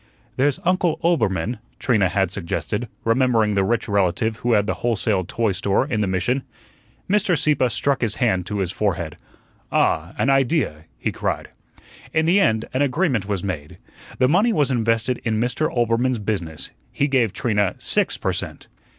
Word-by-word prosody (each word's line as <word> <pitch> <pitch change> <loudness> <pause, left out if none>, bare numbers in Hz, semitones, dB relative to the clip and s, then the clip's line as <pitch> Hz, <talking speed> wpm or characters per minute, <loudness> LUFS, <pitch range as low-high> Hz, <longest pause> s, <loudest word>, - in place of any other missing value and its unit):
"There's 135 +2 +1
Uncle 180 -2 +1
Oelbermann," 115 - +1 0.2
Trina 105 -9 +2
had 95 +1 0
suggested, 105 +5 -3 0.2
remembering 115 -2 +2
the 100 -1 +2
rich 115 +4 0
relative 100 +2 +1
who 120 +1 0
had 105 -2 +3
the - - 0
wholesale 110 -4 +1
toy 115 +3 0
store 95 +5 +1
in 120 -7 -2
the 105 - +1
Mission. 95 +9 0 0.7
Mr. 195 -3 +2
Sieppe 140 -3 +2
struck 140 +2 0
his 110 -3 0
hand 95 -8 +1
to 105 - -3
his 90 -2 -1
forehead. 90 -7 -2 0.6
"Ah, 80 +4 +1
an 135 - +2
idea," 135 - +1
he - - -2
cried. - - -3 0.6
In 160 0 +2
the 180 +5 +4
end 110 - +2
an 130 - 0
agreement 140 - +1
was 100 -4 -2
made. 80 -7 -5 0.4
The 130 - +4
money 195 - +3
was 145 - +2
invested 115 0 0
in 110 -2 0
Mr. 125 +7 0
Oelbermann's 120 0 +1
business. 95 -7 -3 0.2
He 145 - 0
gave 125 -7 +2
Trina 105 -4 0
six - - 0
per - - -1
cent. - - -5
115 Hz, 170 wpm, -22 LUFS, 100-135 Hz, 0.7 s, the